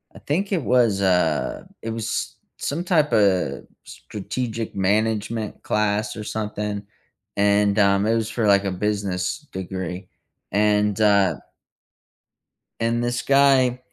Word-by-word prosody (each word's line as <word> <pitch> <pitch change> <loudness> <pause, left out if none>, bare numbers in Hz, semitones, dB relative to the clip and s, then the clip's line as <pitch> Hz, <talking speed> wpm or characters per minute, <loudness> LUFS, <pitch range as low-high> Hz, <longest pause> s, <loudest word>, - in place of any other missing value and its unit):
I - - -11
think 190 +8 -2
it 175 -7 0
was 120 -6 +3
a 90 -5 +1
it 115 - -5
was 110 -1 -3 0.2
some 160 +5 -3
typa 110 - +2 0.2
strategic 110 +2 -5
management 105 +2 -1
class 105 0 0
or 105 - -6
something, 105 -1 -4 0.5
and, 100 0 +3
um, 100 0 +3
it 115 - +2
was 110 -1 -1
for 115 -1 -1
like 100 0 +5
a 100 - 0
business 100 +4 -2
degree, 95 -1 -5 0.5
and, 105 0 +2
uh 100 -2 +4 1.5
and, 115 +1 0
this 120 0 -1
guy, 135 -3 +4
105 Hz, 120 wpm, -23 LUFS, 100-115 Hz, 1.5 s, like